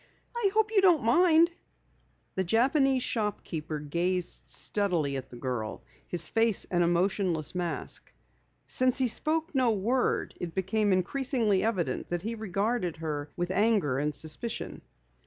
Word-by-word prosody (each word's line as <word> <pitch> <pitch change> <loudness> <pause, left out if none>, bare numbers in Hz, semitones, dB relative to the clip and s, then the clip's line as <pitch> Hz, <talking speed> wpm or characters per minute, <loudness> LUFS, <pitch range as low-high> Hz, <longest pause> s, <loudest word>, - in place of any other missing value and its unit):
"I 465 -4 +2
hope 435 -1 +2
you 410 -3 +4
don't 350 -7 +4
mind." 335 +7 +5 0.8
The 190 - -1
Japanese 260 - +2
shopkeeper 170 -8 -3
gazed 170 +5 -2
steadily 175 -9 0
at 135 - -6
the - - -11
girl, 120 -5 -4 0.2
his 170 -3 +2
face 225 0 +2
an 175 -1 +2
emotionless 175 -2 +1
mask. 175 -2 -3 0.5
Since 255 -1 +1
he 260 -2 +2
spoke 315 +8 +1
no 260 -3 +3
word, 235 +6 0
it 170 -2 -5
became 200 +2 +1
increasingly 215 +1 +1
evident 210 -6 -1
that 175 0 -3
he 225 +2 -3
regarded 210 -3 -1
her 150 -2 -4
with 175 +1 -2
anger 195 - +2
and 150 +1 -1
suspicion. 160 +9 -3
195 Hz, 140 wpm, -29 LUFS, 170-245 Hz, 0.8 s, mind